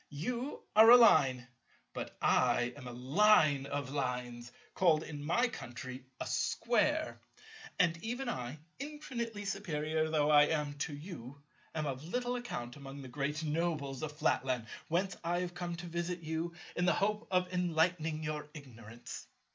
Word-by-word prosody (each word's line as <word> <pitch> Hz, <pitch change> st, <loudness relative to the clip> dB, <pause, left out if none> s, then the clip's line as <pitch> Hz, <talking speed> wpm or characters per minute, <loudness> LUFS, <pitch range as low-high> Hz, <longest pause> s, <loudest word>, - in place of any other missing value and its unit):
You 245 Hz, -, -4 dB
are 220 Hz, +1 st, +9 dB
a 245 Hz, -, +12 dB
Line, 130 Hz, -, +5 dB, 0.5 s
but -, -, -6 dB
I 120 Hz, 0 st, +3 dB
am 135 Hz, -3 st, -9 dB
a -, -, -6 dB
Line 145 Hz, -, +4 dB
of 140 Hz, -2 st, -3 dB
Lines 125 Hz, -3 st, -3 dB, 0.2 s
called 160 Hz, -4 st, +3 dB
in 145 Hz, -2 st, -7 dB
my 235 Hz, +12 st, +2 dB
country 130 Hz, -, -8 dB
a -, -, -3 dB
Square: -, -, +1 dB, 0.6 s
and 165 Hz, -2 st, +2 dB
even 245 Hz, +4 st, -3 dB
I, 125 Hz, -, -3 dB, 0.2 s
infinitely 245 Hz, -7 st, -5 dB
superior 160 Hz, -5 st, -1 dB
though 150 Hz, -1 st, +2 dB
I 150 Hz, 0 st, +8 dB
am 150 Hz, -2 st, -1 dB
to 145 Hz, 0 st, -2 dB
you, 145 Hz, -4 st, -9 dB, 0.3 s
am 155 Hz, -1 st, -1 dB
of 135 Hz, -1 st, -4 dB
little 245 Hz, +8 st, -2 dB
account 120 Hz, -, -5 dB
among 140 Hz, 0 st, -9 dB
the 130 Hz, -, -9 dB
great 145 Hz, +4 st, -2 dB
nobles 150 Hz, -4 st, -1 dB
of 155 Hz, -1 st, -4 dB
Flatland, 130 Hz, -5 st, +1 dB, 0.2 s
whence 185 Hz, +4 st, 0 dB
I 175 Hz, +1 st, 0 dB
have 180 Hz, -1 st, -4 dB
come 175 Hz, -1 st, -4 dB
to 175 Hz, +1 st, -7 dB
visit 170 Hz, +1 st, -3 dB
you, 160 Hz, +2 st, -3 dB, 0.2 s
in 175 Hz, -, +1 dB
the -, -, +4 dB
hope 210 Hz, +3 st, 0 dB
of 180 Hz, 0 st, +1 dB
enlightening 165 Hz, -2 st, +1 dB
your 150 Hz, -1 st, -4 dB
ignorance." 120 Hz, -5 st, -10 dB
155 Hz, 155 wpm, -33 LUFS, 140-180 Hz, 0.6 s, a